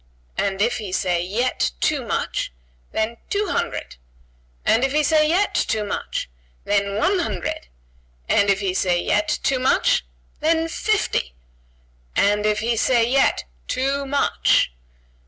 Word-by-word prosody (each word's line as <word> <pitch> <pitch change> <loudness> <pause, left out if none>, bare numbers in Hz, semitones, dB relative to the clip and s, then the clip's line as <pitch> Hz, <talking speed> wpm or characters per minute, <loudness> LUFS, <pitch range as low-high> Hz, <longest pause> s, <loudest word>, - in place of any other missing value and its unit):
"And 195 0 0
if 240 +2 +1
he 205 -4 -6
say 180 -2 0
yet, 205 - 0
too - - +1
much?" - - -2 0.4
"Then 220 +2 -1
two 410 -2 0
hundred!" 65 - -3 0.7
"And 230 - +3
if 270 0 +1
he 305 0 +3
say 305 0 +3
yet, 375 +5 +2
too 220 -2 0
much?" 205 - -3 0.4
"Then 200 -1 0
one 370 - +2
hundred!" 330 - -3 0.6
"And 200 - +3
if 200 +1 +2
he 190 -2 0
say 180 -2 +1
yet, 210 +3 +1
too 265 -1 +1
much?" 255 - +2 0.4
"Then, 325 +1 +2
fifty!" 330 - -1 0.8
"And 210 +1 +3
if 210 0 +1
he 230 +1 +1
say 235 +1 +3
yet, 270 +2 +2 0.2
too 275 +1 -1
much?" 280 - +2
230 Hz, 140 wpm, -22 LUFS, 200-280 Hz, 0.8 s, And